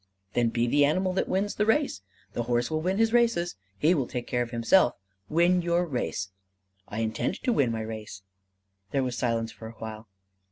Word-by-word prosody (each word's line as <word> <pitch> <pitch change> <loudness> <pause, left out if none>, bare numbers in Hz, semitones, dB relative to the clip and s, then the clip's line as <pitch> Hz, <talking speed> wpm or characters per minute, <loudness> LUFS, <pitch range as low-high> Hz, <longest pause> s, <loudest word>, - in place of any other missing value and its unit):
"Then 120 -1 +2
be 115 +1 +1
the 145 +4 +3
animal 185 +6 +2
that 190 - 0
wins 200 +2 0
the 210 - +1
race! 245 - +2 0.3
The - - -1
horse 120 +2 +1
will 155 0 0
win 185 +4 0
his 225 +1 +3
races: 230 -8 +2 0.2
he 155 - +4
will 135 -8 0
take 125 -1 -4
care 125 - 0
of 120 - -2
himself: 120 +5 +4 0.3
win 175 +2 +4
your 170 +1 +1
race." 120 - -3 0.6
"I 110 +2 -3
intend 110 +10 -1
to 245 - +2
win 130 - +2
my 110 -1 -2
race." 110 -3 -7 0.7
There 135 -1 +1
was 125 -2 -2
silence 115 -2 0
for 110 - -10
a 115 - -9
while. 110 0 -7
130 Hz, 200 wpm, -27 LUFS, 115-180 Hz, 0.7 s, he